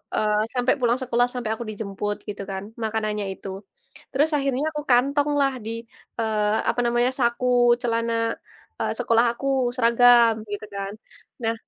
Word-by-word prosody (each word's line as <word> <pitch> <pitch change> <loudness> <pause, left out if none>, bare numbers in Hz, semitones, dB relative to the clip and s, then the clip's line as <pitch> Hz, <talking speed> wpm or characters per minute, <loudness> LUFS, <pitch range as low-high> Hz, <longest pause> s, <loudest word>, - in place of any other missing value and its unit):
eee, 210 0 +1 0.2
sampai 250 0 +2
pulang 240 -1 +2
sekolah 245 -1 +2
sampai 240 -4 -3
aku 235 - -6
dijemput 205 -1 -4
gitu 200 -1 -5
kan 190 0 -4 0.2
makanannya 215 -1 -1
itu, 195 - -9 0.6
terus 295 +4 +2
akhirnya 275 0 0
aku 300 - -4
kantong 280 +4 +3
lah 275 -1 +2
di, 225 - -3 0.5
eee, 215 -1 +1
apa - - 0
namanya 240 +1 +2
saku 240 0 +1 0.3
celana, 230 -1 0 0.7
eee, - - 0
sekolah 230 +1 +3
aku 275 - -4 0.3
seragam 235 -1 +6 0.2
gitu 205 +1 -4
kan, 200 0 -4 0.5
nah, 225 0 +1
235 Hz, 150 wpm, -24 LUFS, 215-250 Hz, 0.7 s, seragam